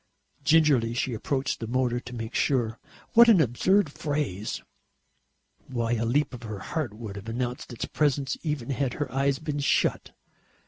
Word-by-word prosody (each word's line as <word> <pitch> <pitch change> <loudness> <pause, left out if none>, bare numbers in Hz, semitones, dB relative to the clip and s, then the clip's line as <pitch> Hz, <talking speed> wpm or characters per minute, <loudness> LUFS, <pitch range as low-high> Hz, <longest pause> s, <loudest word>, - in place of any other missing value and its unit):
Gingerly 145 -8 +4
she 125 +1 -1
approached 130 +4 -1
the 115 - -4
motor 125 0 +1
to 125 0 -9
make 115 0 -5
sure. 120 -5 +1 0.3
What 235 +1 +8
an 210 -6 +7
absurd 160 - +3
phrase! 145 - -3 1.0
Why, 120 -3 -2
a 115 -1 +1
leap 140 +5 +1
of 120 - -8
her 110 -3 -6
heart 125 - -3
would 110 -3 -7
have 100 +3 -7
announced 125 +2 -3
its 120 - -4
presence, 140 -3 0
even 150 -5 -2
had 135 -1 -1
her 145 -4 -3
eyes 135 +1 +1
been 150 -1 -3
shut. 140 - +1
130 Hz, 165 wpm, -27 LUFS, 115-145 Hz, 1.0 s, What